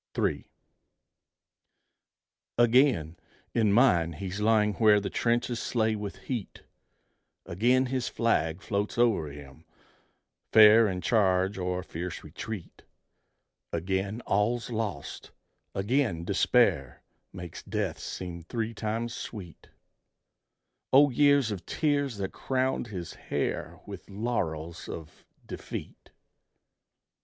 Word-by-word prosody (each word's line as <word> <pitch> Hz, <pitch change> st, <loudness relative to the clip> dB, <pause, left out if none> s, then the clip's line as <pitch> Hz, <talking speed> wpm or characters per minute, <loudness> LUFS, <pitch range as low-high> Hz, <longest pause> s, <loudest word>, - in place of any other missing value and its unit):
III. -, -, 0 dB, 2.1 s
Again, 120 Hz, -, +3 dB, 0.4 s
in 110 Hz, -3 st, +3 dB
mind, 90 Hz, -, +4 dB
he's 95 Hz, +4 st, -5 dB
lying 105 Hz, -1 st, +3 dB
where 105 Hz, -1 st, +5 dB
The 100 Hz, -1 st, -4 dB
trenches 120 Hz, 0 st, 0 dB
slay 110 Hz, -2 st, 0 dB
with 105 Hz, -1 st, -7 dB
heat; 120 Hz, -7 st, -5 dB, 0.8 s
Again 125 Hz, +9 st, +2 dB
his 130 Hz, -1 st, -2 dB
flag 85 Hz, -6 st, 0 dB
floats 105 Hz, 0 st, -2 dB
o'er 115 Hz, -10 st, +3 dB
him, 70 Hz, +1 st, -11 dB, 0.9 s
fair 110 Hz, +1 st, +8 dB
In 90 Hz, -2 st, -3 dB
charge 95 Hz, -3 st, +2 dB
or 90 Hz, 0 st, -2 dB
fierce 85 Hz, +1 st, -6 dB
retreat: 90 Hz, +4 st, -8 dB, 0.9 s
Again 95 Hz, +6 st, -2 dB
all's 115 Hz, +4 st, 0 dB
lost; 110 Hz, -9 st, -4 dB, 0.5 s
again 105 Hz, -, 0 dB
despair 95 Hz, -, +2 dB, 0.3 s
Makes 90 Hz, -3 st, -8 dB
death -, -, -3 dB
seem 90 Hz, -2 st, -6 dB
three 115 Hz, +6 st, -3 dB
times 115 Hz, +2 st, -3 dB
sweet 95 Hz, -10 st, -8 dB, 1.2 s
O 140 Hz, +1 st, +6 dB
years 140 Hz, -2 st, +4 dB
of 100 Hz, -4 st, -5 dB
tears 145 Hz, -6 st, 0 dB
that 95 Hz, -1 st, -3 dB
crowned 130 Hz, -1 st, -1 dB
his 90 Hz, -5 st, -6 dB
hair -, -, -3 dB
With -, -, -10 dB
laurels 85 Hz, -7 st, -3 dB
of 80 Hz, -2 st, -9 dB, 0.2 s
defeat! -, -, -8 dB
105 Hz, 105 wpm, -28 LUFS, 90-120 Hz, 2.1 s, fair